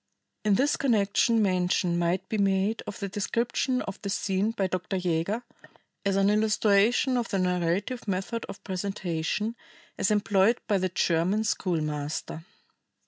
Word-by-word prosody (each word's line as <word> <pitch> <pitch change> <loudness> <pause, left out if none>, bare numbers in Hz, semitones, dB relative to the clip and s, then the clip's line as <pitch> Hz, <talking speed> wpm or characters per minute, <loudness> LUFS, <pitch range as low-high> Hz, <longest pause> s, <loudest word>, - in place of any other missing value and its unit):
In 210 -2 +3
this 280 +7 +2
connection 225 -2 +2
mention 180 -2 +1
might 175 +2 0
be 215 - -2
made 195 +2 +1
of - - -5
the 200 - -3
description 235 +6 -1
of 195 - -7
this 200 -1 -2
scene 195 +2 0
by 225 -4 -1
Dr. 185 +1 -2
Jaeger 180 +6 -1 0.6
as 200 -1 +1
an 195 +1 +3
illustration 215 +4 +3
of 235 -1 -2
the 195 - 0
narrative 180 +6 -1
method 195 +4 -2
of - - -9
presentation 195 +2 -2 0.4
as - - +2
employed 210 +1 +3
by 205 -3 +2
the 185 0 0
German 180 +4 +1
schoolmaster. 155 -5 -2
195 Hz, 140 wpm, -27 LUFS, 180-215 Hz, 0.6 s, In